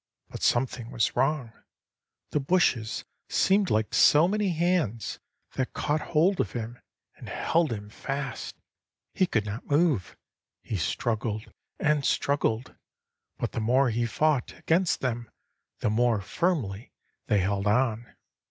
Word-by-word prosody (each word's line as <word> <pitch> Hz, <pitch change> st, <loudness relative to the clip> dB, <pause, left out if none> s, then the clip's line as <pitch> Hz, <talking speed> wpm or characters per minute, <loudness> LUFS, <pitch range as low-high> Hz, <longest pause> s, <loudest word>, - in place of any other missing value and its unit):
But -, -, -8 dB
something 120 Hz, -1 st, +1 dB
was 120 Hz, -2 st, 0 dB
wrong; 135 Hz, -2 st, 0 dB, 0.8 s
the 150 Hz, -, +1 dB
bushes 135 Hz, -8 st, +1 dB, 0.2 s
seemed 195 Hz, 0 st, +3 dB
like 110 Hz, 0 st, 0 dB
so 150 Hz, +3 st, +6 dB
many 210 Hz, +1 st, 0 dB
hands, 170 Hz, -, 0 dB, 0.3 s
that 130 Hz, -1 st, -2 dB
caught 150 Hz, +1 st, 0 dB
hold 175 Hz, +4 st, +2 dB
of -, -, -4 dB
him, 120 Hz, 0 st, -5 dB, 0.4 s
and -, -, -10 dB
held 165 Hz, -3 st, +1 dB
him 105 Hz, -2 st, -5 dB
fast. 135 Hz, 0 st, -4 dB, 0.6 s
He 185 Hz, -, +2 dB
could 110 Hz, -8 st, 0 dB
not 105 Hz, +5 st, -6 dB
move. 145 Hz, -, +1 dB, 0.5 s
He 110 Hz, -, -3 dB
struggled 110 Hz, +4 st, -2 dB, 0.3 s
and 150 Hz, -1 st, +2 dB
struggled, 130 Hz, -4 st, 0 dB, 0.6 s
but -, -, -2 dB
the -, -, -3 dB
more 125 Hz, +3 st, +3 dB
he 120 Hz, +1 st, 0 dB
fought 150 Hz, +2 st, 0 dB
against 170 Hz, +2 st, +1 dB
them, 120 Hz, -3 st, -2 dB, 0.5 s
the -, -, +1 dB
more 115 Hz, 0 st, +2 dB
firmly 115 Hz, -, -2 dB, 0.4 s
they 105 Hz, -, +3 dB
held 100 Hz, +1 st, 0 dB
on. 115 Hz, +1 st, +1 dB
125 Hz, 135 wpm, -27 LUFS, 110-155 Hz, 0.8 s, so